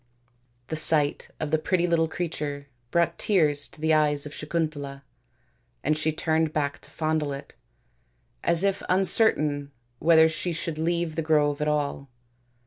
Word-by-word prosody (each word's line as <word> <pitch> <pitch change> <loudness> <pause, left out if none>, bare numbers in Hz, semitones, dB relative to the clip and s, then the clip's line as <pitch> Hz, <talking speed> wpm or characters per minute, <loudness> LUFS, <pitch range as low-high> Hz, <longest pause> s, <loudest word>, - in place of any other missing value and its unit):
The 160 - -3
sight 150 -2 +6
of 155 -1 -4
the 155 - +2
pretty 175 +2 0
little 165 -2 +1
creature 150 -4 -5 0.2
brought 170 +4 0
tears 150 -8 +1
to - - -11
the 160 +1 +1
eyes 150 -2 +1
of 150 - -9
Sakuntala, 150 -3 -4 0.8
and 155 +2 +1
she 155 +1 -1
turned 160 0 -1
back 145 -2 -2
to - - -15
fondle 155 -2 -2
it, 140 +1 -10 0.9
as 170 +1 +5
if 200 0 0
uncertain 155 -7 +2 0.3
whether 160 0 +5
she 170 +2 -4
should 160 -1 -5
leave 170 0 -2
the 165 - -2
grove 150 -2 +1
at 150 - -1
all. 145 -2 -2
155 Hz, 150 wpm, -25 LUFS, 145-165 Hz, 0.9 s, sight